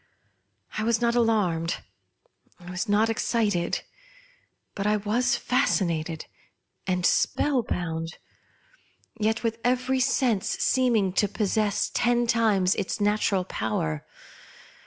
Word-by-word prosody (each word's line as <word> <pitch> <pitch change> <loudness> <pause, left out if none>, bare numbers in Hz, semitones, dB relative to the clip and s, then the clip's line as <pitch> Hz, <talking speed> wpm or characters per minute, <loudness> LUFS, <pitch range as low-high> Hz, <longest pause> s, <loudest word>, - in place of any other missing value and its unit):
Fwas 220 +1 +1
not 235 0 +2
alarmed, 205 -9 +1 0.8
I 175 0 -10
was 180 +4 -3
not 210 +2 +3
excited; 215 -5 0 0.9
but 200 +1 -2
I 210 0 +3
was 225 +5 +1
fascinated 170 - 0 0.6
and 180 -1 0
spell 275 +5 +2
bound; 165 -5 -4 1.0
yet 220 +2 0
with 230 0 -1
every 255 +1 +1
sense 255 -5 +1
seeming 230 -8 +2
to 205 - +2
possess 210 0 0
ten 240 0 +2
times 220 -5 +2
its 200 +1 -3
natural 205 -2 +1
power. 90 - -2
210 Hz, 105 wpm, -26 LUFS, 180-235 Hz, 1.0 s, not